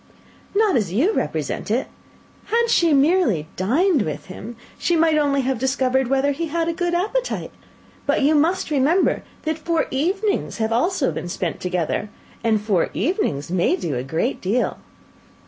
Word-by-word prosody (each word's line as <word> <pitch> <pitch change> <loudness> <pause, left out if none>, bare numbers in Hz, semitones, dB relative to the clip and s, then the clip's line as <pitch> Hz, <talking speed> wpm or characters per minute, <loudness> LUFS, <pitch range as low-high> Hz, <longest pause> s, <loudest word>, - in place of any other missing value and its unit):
"Not 420 -3 +3
as 205 -7 0
you 295 - +2
represent - - -2
it. - - +1 0.6
Had 465 +1 +1
she 340 -7 +4
merely 285 - +3
dined 285 - +2
with 155 -6 -4
him, 230 +5 -8 0.2
she 345 - +1
might 320 -1 +3
only 285 -2 +2
have 260 -2 -1
discovered 265 0 +1
whether 270 +2 +2
he 330 +4 -3
had 330 +1 -1
a 335 - 0
good 345 0 -1
appetite; 455 +8 -1 0.6
but - - +2
you 295 +3 +4
must 320 +3 +1
remember 300 +6 +2 0.2
that 315 0 -2
four 330 0 0
evenings 385 +10 0
have 220 0 -1
been 225 - +3
also 310 - -1
spent 175 - -3
together 180 +3 -2 0.3
and 220 -2 +2
four 200 -6 +1
evenings 165 - -1
may 180 0 +2
do 170 -5 -3
a 125 - -1
great 160 - -2
deal." 215 +7 0
280 Hz, 165 wpm, -22 LUFS, 220-345 Hz, 0.6 s, she